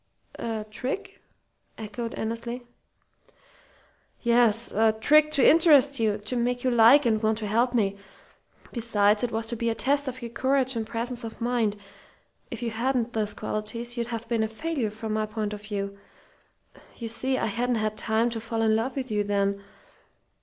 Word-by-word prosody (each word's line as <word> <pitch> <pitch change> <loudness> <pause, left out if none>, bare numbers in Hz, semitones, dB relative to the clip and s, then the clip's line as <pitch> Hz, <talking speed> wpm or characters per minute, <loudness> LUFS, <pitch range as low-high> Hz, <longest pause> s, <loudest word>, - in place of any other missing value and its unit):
"A 220 -2 -3
trick?" 385 - -5 0.6
echoed 225 +2 -5
Annesley. 235 +2 -4 1.6
"Yes. 235 -1 +3
A 220 +1 +3
trick 300 +8 +4
to 285 -4 +4
interest 290 -4 +5
you 215 -2 +1
to 210 +4 -4
make 245 +1 -1
you 255 - +2
like 240 +5 +6
and 220 -2 +2
want 220 -1 +1
to 220 - -4
help 235 +4 +1
me. 200 -3 +1 0.7
Besides, 210 -3 +2
it 245 - -1
was 225 +1 -2
to 235 - -2
be 235 +1 -1
a 225 - -1
test 285 +4 +1
of 255 -1 -5
your 235 - -6
courage 260 +1 +1
and 225 -1 -3
presence 235 +1 -4
of 225 -1 -8
mind. 230 -3 0 0.7
If - - -6
you 230 - -2
hadn't 240 +1 -1
those 210 -2 -1
qualities 230 +3 -3
you'd 235 -1 -2
have 230 -1 -5
been 230 -2 0
a 220 - +1
failure 255 +1 -3
from 220 +1 -5
my 215 0 -1
point 215 -1 -3
of 205 - -7
view. 200 -2 -4 1.0
You 230 - -6
see, 260 +3 +1
I - - -1
hadn't 240 +3 -1
had 215 -1 -1
time 220 +2 +1
to 225 -1 -4
fall 225 0 -2
in 220 -1 +3
love 235 +4 -1
with 260 -3 -4
you 210 -1 +1
then. 200 -1 0
230 Hz, 180 wpm, -26 LUFS, 215-245 Hz, 1.6 s, like